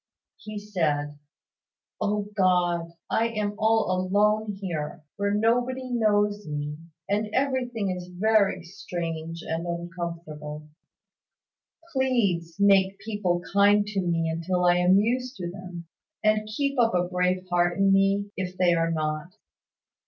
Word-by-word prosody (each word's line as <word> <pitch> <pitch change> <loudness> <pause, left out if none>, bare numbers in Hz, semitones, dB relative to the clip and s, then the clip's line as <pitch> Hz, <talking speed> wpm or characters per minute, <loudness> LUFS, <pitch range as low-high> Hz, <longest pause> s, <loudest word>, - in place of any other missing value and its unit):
He 215 0 -8
said 150 -8 -1 0.8
"O 205 0 0
God, 175 -3 +2 0.2
I 230 - +2
am 210 -3 -2
all 220 -2 +3
alone 205 +3 +2
here, 160 -6 -4
where 200 0 0
nobody 245 +4 +1
knows 210 -3 +1
me; 150 0 -3 0.3
and 210 +2 0
everything 250 -6 0
is 180 -1 -5
very 195 0 +2
strange 165 -3 -5
and 165 +2 -3
uncomfortable. 170 -3 -6 1.3
Please, 205 -11 +1
make 195 -1 +4
people 190 -5 -1
kind 205 +1 +5
to 200 -2 -1
me 165 -2 0
till 180 +1 +1
I 175 0 +5
am 180 +2 +5
used 250 +5 0
to 175 - -5
them; 180 -2 -8 0.4
and 215 0 +2
keep 275 +4 -1
up 230 -4 +3
a 180 0 +1
brave 180 0 0
heart 175 0 +2
in 195 0 +4
me, 195 +1 +2
if 185 -1 -4
they 180 -1 +4
are 165 0 +1
not. 155 +2 -2
190 Hz, 130 wpm, -26 LUFS, 170-210 Hz, 1.3 s, kind